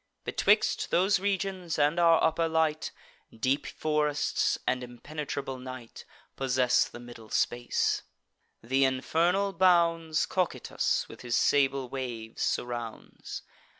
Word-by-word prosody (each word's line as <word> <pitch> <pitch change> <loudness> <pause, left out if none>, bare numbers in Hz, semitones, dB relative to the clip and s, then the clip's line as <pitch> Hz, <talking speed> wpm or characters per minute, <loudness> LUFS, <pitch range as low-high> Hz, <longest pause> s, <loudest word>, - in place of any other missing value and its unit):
Betwixt 215 +1 +2
those 190 +2 +3
regions 190 -3 -2
and 150 +3 +2
our 165 -1 +5
upper 165 +1 +2
light, 160 -1 0 0.4
Deep 130 +5 -1
forests 150 -1 0
and 125 0 0
impenetrable 135 +1 -6
night 130 -2 -9 0.3
Possess 130 -2 +2
the - - -11
middle 120 -2 -12
space: 120 0 0 0.7
th' - - -16
infernal 170 +9 +2
bounds 170 -3 +3
Cocytus, 185 -2 -1
with 115 - -12
his 120 0 -1
sable 135 -2 +2
waves, 120 -4 -6
surrounds. 120 -2 -4
145 Hz, 110 wpm, -29 LUFS, 125-170 Hz, 0.7 s, our